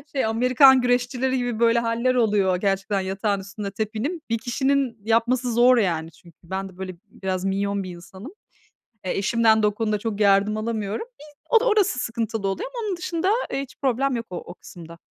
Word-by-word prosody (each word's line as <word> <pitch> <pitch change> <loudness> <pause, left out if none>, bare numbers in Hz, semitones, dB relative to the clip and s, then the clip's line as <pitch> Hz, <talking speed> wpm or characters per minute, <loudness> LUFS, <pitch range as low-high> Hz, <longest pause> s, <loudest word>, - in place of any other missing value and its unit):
şey, 265 - +1
Amerikan 255 +4 +5
güreşçileri 250 +1 0
gibi, 245 -3 -2
böyle, 235 0 +4
hâller 235 +2 0
oluyor 205 -6 +2
gerçekten 195 +1 -1
yatağın 195 +1 -1
üstünde 200 +1 -6
tepinim. 220 - -3
1 230 - +1
kişinin 265 +1 0
yapması 235 +2 +1
zor, 245 +1 +5
yani, 165 -6 0
çünkü, 170 +1 -20
ben 190 +3 -4
de 185 - -18
böyle 185 -1 -6 0.2
biraz 190 -1 -3
minyon 200 +1 -1
1 185 - -7
insanım. 190 - -11 0.7
E, 185 - -2
eşimden 220 +1 +2
de - - +5
o 210 - -2
konuda 215 -1 0
çok 215 -1 -4
yardım 200 +1 +3
alamıyorum. 215 - -3
Bir 295 - -12 0.2
o 470 - +6
orası 415 - +2
sıkıntılı 225 -3 -2
oluyor 195 - -3
ama 465 -3 -3
onun 380 -3 -2
dışında, 350 +2 -1 0.2
eee, 275 - -1
hiç 275 - -10
problem 270 0 +1
yok 230 -1 -4
o 180 - -5
o - - -8
kısımda. 170 -2 -12
225 Hz, 185 wpm, -23 LUFS, 195-250 Hz, 0.7 s, o